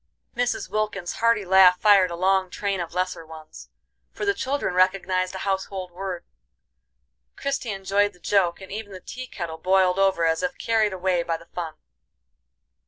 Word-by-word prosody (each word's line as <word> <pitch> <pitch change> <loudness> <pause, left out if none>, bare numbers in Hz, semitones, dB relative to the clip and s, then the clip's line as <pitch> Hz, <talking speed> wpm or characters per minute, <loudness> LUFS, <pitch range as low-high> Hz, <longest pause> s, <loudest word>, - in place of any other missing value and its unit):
'" - - -53
Mrs. 245 0 -1
Wilkins' 210 -4 -3
hearty 230 -3 +2
laugh 185 -1 +6
fired 200 -3 +5
a 170 - -5
long 190 +1 +2
train 200 0 -2
of 170 0 -5
lesser 185 -2 -2
ones, 160 -1 -12 0.4
for - - -5
the 400 - +3
children 275 - -2
recognized 185 0 +1
a 190 - -5
household 190 -1 -3
word. 180 -1 -5 1.1
Christie 275 -3 -3
enjoyed 200 +1 0
the 180 - -21
joke, 180 -1 +1
and 190 - -10
even 205 -1 -6
the 185 - -8
tea 255 +7 -8
kettle 165 -7 -6
boiled 185 0 +3
over 190 -3 +3
as 160 0 +1
if 270 0 -2
carried 220 -2 +1
away 185 -1 0
by 165 -1 -2
the 165 - -16
fun. 165 -3 -6
190 Hz, 170 wpm, -24 LUFS, 180-205 Hz, 1.1 s, laugh